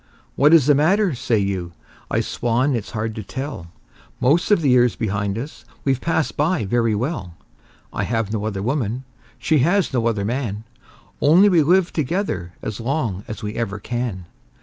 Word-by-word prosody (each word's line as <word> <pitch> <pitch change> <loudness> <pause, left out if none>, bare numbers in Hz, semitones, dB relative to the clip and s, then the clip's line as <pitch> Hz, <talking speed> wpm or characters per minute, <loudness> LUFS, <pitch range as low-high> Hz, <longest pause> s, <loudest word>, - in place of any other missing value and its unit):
"What 145 +2 +5
is 165 -6 +6
the 145 - +5
matter?" 180 +6 +3
say 120 -2 0
you. 95 -4 -2 0.4
I - - +1
swan 125 +4 0
it's 110 -3 -4
hard 110 -1 -3
to 110 - -5
tell! 130 - -6 0.5
Most 145 +8 +2
of 205 -5 +4
the 140 - +3
years 125 -2 +4
behind 100 -2 -2
us 135 +7 -7 0.2
we've 135 -2 0
passed 160 -2 0
by 150 - +1
very 115 +1 +1
well; 105 - -3 0.6
I - - -1
have 115 -2 -1
no 105 -1 -2
other 100 -3 -3
woman, 125 -1 -1 0.3
she 155 -2 +2
has 175 +5 +2
no 120 -2 +1
other 105 -4 0
man 110 -3 -3 0.6
Only 175 +8 +6
we've 165 -6 +3
lived 180 0 +3
together 140 - -2
as 110 - -4
long 115 -6 -2
as 110 0 -7
we 105 0 -3
ever 110 -4 -3
can. 115 -5 -4
120 Hz, 175 wpm, -21 LUFS, 105-150 Hz, 0.6 s, is